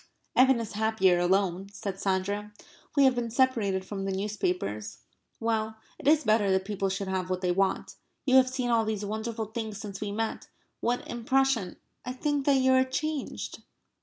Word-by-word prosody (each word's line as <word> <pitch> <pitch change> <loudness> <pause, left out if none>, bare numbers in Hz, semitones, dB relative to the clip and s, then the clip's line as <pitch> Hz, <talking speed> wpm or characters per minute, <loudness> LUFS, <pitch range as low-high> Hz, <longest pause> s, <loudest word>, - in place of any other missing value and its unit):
"Evan 260 -1 +5
is 225 -2 -4
happier 210 -4 +3
alone," 190 +1 +1
said 200 -1 -5
Sandra. 200 +2 -1 0.5
"We 280 - +7
have 265 -1 +6
been 240 -1 -2
separated 225 -7 +1
from 195 0 -5
the 195 - -1
newspapers. 180 - -2 0.4
Well, 220 -1 -1 0.2
it - - -5
is 310 +1 +5
better 215 -3 +3
that 190 0 +2
people 195 -1 -1
should 195 +1 -3
have 185 -1 -2
what 185 0 -1
they 180 -1 +1
want.... 195 +1 0 0.3
You 260 -1 +5
have 255 -1 +5
seen 255 -2 -1
all 230 -1 +4
these 215 -2 -2
wonderful 220 +2 -3
things 220 -1 -5
since 200 -2 -7
we 205 -1 -2
met.... 225 +2 -3 0.3
What 245 +1 -1
impression... 240 -4 +1 0.3
I 250 - -4
think 290 +1 -1
that 280 - +6
you 260 0 +4
are 260 0 +5
changed." 295 +2 -3
215 Hz, 180 wpm, -28 LUFS, 195-250 Hz, 0.5 s, We